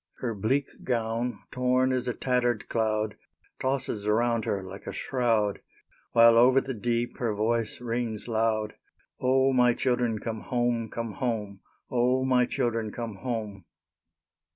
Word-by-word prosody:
Her 120 -3 -2
bleak 130 +7 -1
gown, 115 0 -1
torn 125 +1 +2
as 130 -1 -1
a 125 - -1
tattered 120 -3 0
cloud, 110 -2 0 0.4
Tosses 130 -6 -2
around 115 +1 +2
her 100 -1 -1
like 95 +1 -10
a - - -2
shroud, 115 -5 0 0.5
While 115 0 +7
over 130 +2 +6
the 135 0 -4
deep 120 +1 -2
her 115 -4 0
voice 115 +2 0
rings 115 -2 -3
loud, 110 -2 0 0.5
"O, 130 +1 +3
my 125 -2 +4
children, 120 -3 +1
come 110 0 -4
home, 120 -2 0
come 115 0 -4
home! 105 -2 -3 0.3
O, 125 +1 +2
my 125 -2 +3
children, 115 -3 -1
come 115 -3 -5
home!" 105 -4 -4
115 Hz, 140 wpm, -27 LUFS, 110-125 Hz, 0.5 s, While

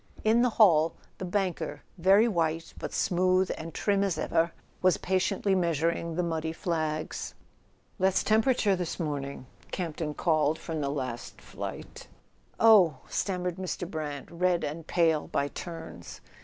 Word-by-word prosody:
In 225 +2 +4
the 250 - +4
hall 165 -7 +5 0.2
the 185 - -3
banker, 185 -1 -2 0.2
very 195 +6 +5
white, 165 -5 -1
but - - -5
smooth 185 0 +2
and 165 +1 -7
trim 200 +2 +1
as 190 -5 0
ever, 165 +1 +1 0.3
was 185 -1 +4
patiently 190 +1 0
measuring 170 -1 0
the 180 - 0
muddy 160 -1 -2
flags. 155 -3 -3 0.6
"Less 190 0 +3
temperature 220 -2 +3
this 180 -1 -4
morning," 140 -4 -4 0.2
Camp 170 -5 -4
ton 150 -3 -3
called 155 -2 +2
from 160 -2 -4
the 140 - -1
last 130 -4 -5
flight. - - -8 0.5
"Oh," 195 -10 +6
stammered 180 -2 -2
Mr. 185 -1 -4
Brant, 150 -4 -5
red 175 0 +1
and 155 +2 -5
pale 165 -3 +2
by 140 - -1
turns. 165 +1 -8
170 Hz, 140 wpm, -28 LUFS, 155-190 Hz, 0.6 s, Oh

